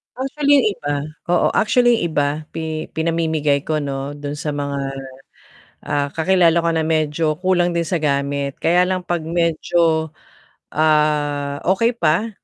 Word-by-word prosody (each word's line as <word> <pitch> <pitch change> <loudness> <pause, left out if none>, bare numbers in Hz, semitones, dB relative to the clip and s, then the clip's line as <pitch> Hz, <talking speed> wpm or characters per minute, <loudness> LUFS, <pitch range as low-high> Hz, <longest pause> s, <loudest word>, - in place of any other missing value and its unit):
Actually, 280 +3 0
yung - - +3
iba 145 -6 -5 0.4
oo, 175 0 +3
actually 240 +1 +3
yung 170 -2 -3
iba 145 -1 +3 0.3
pi 160 -1 -4
pinamimigay 160 -3 0
ko 155 -1 0
'no, 140 0 -4
dun 145 0 -6
sa 150 -2 -3
mga, 140 -1 -3 1.1
ah, 145 -1 -1
kakilala 170 +1 +3
ko 170 0 +1
na 160 - +1
medyo 155 -1 0
kulang 180 0 +1
din 170 -1 -1
sa 170 0 -2
gamit 140 -1 -1
kaya 175 +2 +3
lang 180 0 -1
'pag 175 -1 -1
medyo, 165 -1 +1 0.6
ah, 150 -2 +1 0.2
okey 230 +4 0
pa 170 +5 +1
160 Hz, 145 wpm, -20 LUFS, 145-175 Hz, 1.1 s, yung